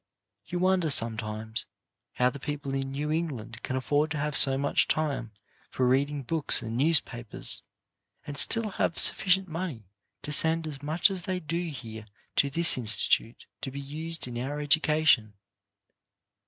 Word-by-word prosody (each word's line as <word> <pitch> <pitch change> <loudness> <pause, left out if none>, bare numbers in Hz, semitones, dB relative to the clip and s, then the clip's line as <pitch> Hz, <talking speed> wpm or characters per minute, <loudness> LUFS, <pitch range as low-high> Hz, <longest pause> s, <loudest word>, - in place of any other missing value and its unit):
You 180 - -4
wonder 185 -2 +2
sometimes 110 -3 +2 0.5
how 125 0 +2
the 140 - -9
people 145 -1 -5
in 135 0 -3
New 150 +2 -3
England 125 -8 -4
can 130 - -4
afford 145 +4 0
to 160 - -3
have 150 0 -2
so 135 -1 +6
much 140 +1 +1
time 140 -7 -2 0.4
for 130 - 0
reading 140 +2 +1
books 155 +1 +1
and 115 0 -5
newspapers, 125 -5 -1 0.6
and 145 - -7
still 225 +9 +1
have 170 -3 -1
sufficient 190 0 +2
money 160 - -5 0.4
to 150 - -5
send 160 +2 +4
as 145 -3 -6
much 160 +7 +2
as 190 -2 -3
they 185 +1 -3
do 170 +1 -3
here 110 -6 -9 0.3
to 140 - +3
this 165 -1 +3
institute 110 +1 +1 0.2
to 140 - -4
be 140 +2 -7
used 155 +2 -5
in 120 -1 -5
our 140 +4 -4
education. 150 -7 +3
145 Hz, 155 wpm, -27 LUFS, 125-160 Hz, 0.6 s, so